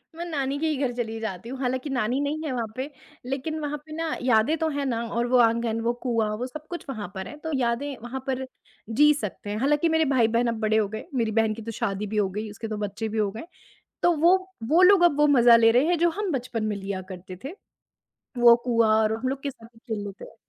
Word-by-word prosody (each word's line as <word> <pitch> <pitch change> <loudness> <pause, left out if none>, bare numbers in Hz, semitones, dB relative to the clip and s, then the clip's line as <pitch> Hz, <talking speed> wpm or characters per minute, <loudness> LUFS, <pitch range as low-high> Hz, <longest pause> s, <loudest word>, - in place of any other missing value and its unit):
मैं 340 +1 -5
नानी 280 -4 -2
के 320 - 0
ही 305 - 0
घर 245 - -5
चली 225 -2 -3
जाती 220 0 -5
हूँ, 265 0 -6
हालाँकि 255 +2 -2
नानी 255 0 0
नहीं 305 +2 -2
है 290 - -2
वहाँ 235 -3 -2
पे, 260 +3 -4 0.4
लेकिन 275 +5 -3
वहाँ 295 0 -3
पे 310 - -14
ना 325 -1 -2
यादें 250 +6 +3
तो 320 0 0
हैं 285 -1 -2
ना, 235 -3 -1
और 235 +1 -1
वो 250 +1 +3
आँगन, 230 -1 +2
वो 235 +1 +1
कुआँ, 225 -3 +1
वो 250 +2 -3
सब 305 +4 -9
कुछ 345 -1 -6
वहाँ 220 -6 -4
पर 190 0 -5
है, - - -9
तो 320 +1 -6
यादें 260 +3 -1
वहाँ 260 +2 -5
पर 265 0 -2 0.4
जी 295 +6 +5
सकते 205 0 -6
हैं। 210 - -2
हालाँकि 295 +5 +2
मेरे 320 -1 +3
भाई-बहन 235 0 +3
अब 230 -1 -2
बड़े 220 0 +2
हो 215 -2 +2
गए, 220 +1 -6
मेरी 230 -3 +1
बहन 220 0 +2
की 225 - -8
तो 230 +1 -5
शादी 200 +1 -2
भी 210 +1 -4
हो 200 -2 +2
गई, 210 +3 -5
उसके 225 +2 -7
2 215 - -4
बच्चे 210 +2 -3
भी 220 - -4
हो 210 -2 +2
गए। 220 - -7 0.6
तो 350 - +5
वो, 345 +5 +5 0.3
वो 315 +10 +3
लोग 370 -1 +7
अब 295 -4 +4
वो 295 - +5
मज़ा 235 0 +8
ले 225 0 +5
रहे 250 +5 +4
हैं, 350 -1 +2
जो 345 0 +4
हम 395 +1 -3
बचपन 245 -4 -3
में 215 -1 -1
लिया 195 -1 -4
करते 185 0 -9
थे, 330 +8 -6 0.8
वो 235 -1 +8
कुआँ, 230 -3 +3
और 215 0 +1
हम 255 - -2
लोग 275 +1 -3
के 280 - -2
साथ 230 -3 -16
ही - - -19
खेल 220 -3 -5
लेते 200 - -8
हैं, - - -14
240 Hz, 260 wpm, -25 LUFS, 220-290 Hz, 0.8 s, मज़ा